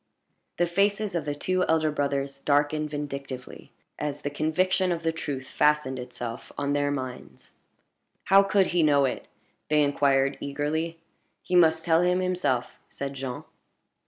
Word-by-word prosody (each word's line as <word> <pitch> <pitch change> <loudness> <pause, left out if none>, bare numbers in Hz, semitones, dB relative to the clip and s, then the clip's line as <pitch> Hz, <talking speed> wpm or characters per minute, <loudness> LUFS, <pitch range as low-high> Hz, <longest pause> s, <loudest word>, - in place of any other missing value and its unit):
The 175 - +3
faces 200 +3 +1
of 170 - -2
the 145 -1 -2
two 185 +4 0
elder 160 -1 +2
brothers 140 -1 -2
darkened 150 +2 +1
vindictively, 140 -3 -6 0.3
as 145 -1 -4
the 145 - -2
conviction 180 +5 +1
of 170 -1 -2
the 165 - +1
truth 145 -5 -5
fastened 150 -3 +1
itself 125 -2 -7
on 140 0 -1
their 145 0 +1
minds. 130 -3 -6 0.7
"How 195 +1 +6
could 195 -1 +3
he 175 - +3
know 145 -3 +4
it?" 130 - -3 0.4
they 150 -1 +4
inquired, 140 -1 +2
eagerly. 150 +4 -2 0.5
"He 180 - -1
must 160 -2 +4
tell 165 -1 +4
us 180 0 +2
himself," 180 -9 -1
said 140 0 -5
Jean. 130 -2 -5
150 Hz, 150 wpm, -26 LUFS, 140-170 Hz, 0.7 s, How